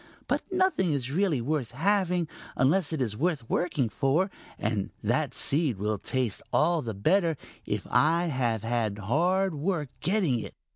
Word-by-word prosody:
But - - +1
nothing 370 - +2
is 135 -2 -2
really 165 -5 +1
worth 135 -1 -1
having 180 - +1 0.3
unless 150 +6 +2
it 155 -5 0
is 110 -4 -3
worth 150 -3 -1
working 150 -6 0
for, 135 - +1 0.3
and 105 -2 -1
that - - 0
seed 145 - +1
will 105 +1 -1
taste 125 -4 -1
all 165 +1 +3
the 115 -5 -4
better 165 - +2 0.3
if - - -2
I 165 +3 +3
have 120 - 0
hard 120 - +1
work 150 -1 -1
getting 180 - +1
it." - - -7
150 Hz, 150 wpm, -28 LUFS, 120-175 Hz, 0.3 s, all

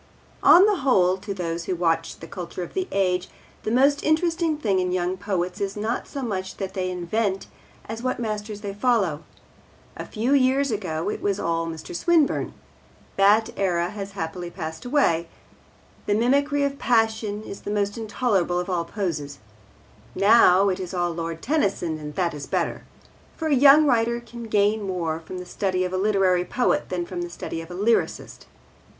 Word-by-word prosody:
On 365 +3 +8
the 415 -2 +2
whole, 190 - +3
to 200 +2 -7
those 170 -3 -3
who 185 - -1
watch 165 -1 0
the 165 - -8
culture 180 0 -6
of - - -9
the 375 0 -2
age, 185 -2 0 0.3
the - - -3
most 275 +5 +3
interesting 325 0 +1
thing 200 -10 +1
in 180 0 0
young 180 0 0
poets 190 -1 -3
is 200 0 -2
not 220 +3 -2
so 275 - -5
much 190 -5 -3
what 190 -1 -4
they 185 -1 -2
invent 190 +3 -1 0.4
as 225 +1 -5
what 255 0 -1
masters 210 -2 -4
they 200 -2 -5
follow. 205 - +1 0.7
A - - -7
few 235 +5 0
years 270 0 +3
ago 175 -7 -3
it - - -6
was 200 -1 0
all 165 0 -1
Mr. 160 +1 -7
Swinburne. 325 - +2 0.6
That 210 +4 +4
era 175 -3 0
has 200 -1 -7
happily 175 -1 -5
passed 160 -1 -7
away. 210 - +2 0.8
The 205 - +2
mimicry 280 +5 +2
of 280 0 -2
passion 220 -3 +1
is 200 - -8
the - - -6
most 205 -1 0
intolerable 205 -5 0
of 180 +1 -3
all 170 -2 0
poses. 160 -7 -4 0.8
Now, 200 -2 +6
it 185 - -2
is 185 0 -5
all 175 -1 0
Lord 165 0 -5
Tennyson, 195 - 0
and 150 -1 -8
that 175 -3 0
is 145 -1 -7
better. - - -2 0.5
For 320 -1 -2
a - - +3
young 280 +3 +7
writer 235 -3 +2
can 235 0 -10
gain 210 0 +2
more 175 -5 -2
from 165 +3 -8
the 180 - -7
study 185 0 -1
of 180 - -4
a - - 0
literary 190 -3 +2
poet 245 +7 0
than 180 -1 -2
from 175 0 -5
the 175 - -4
study 165 -1 -6
of 165 - -11
a 175 - -7
lyrist. 220 +5 -1
195 Hz, 180 wpm, -24 LUFS, 175-235 Hz, 0.8 s, On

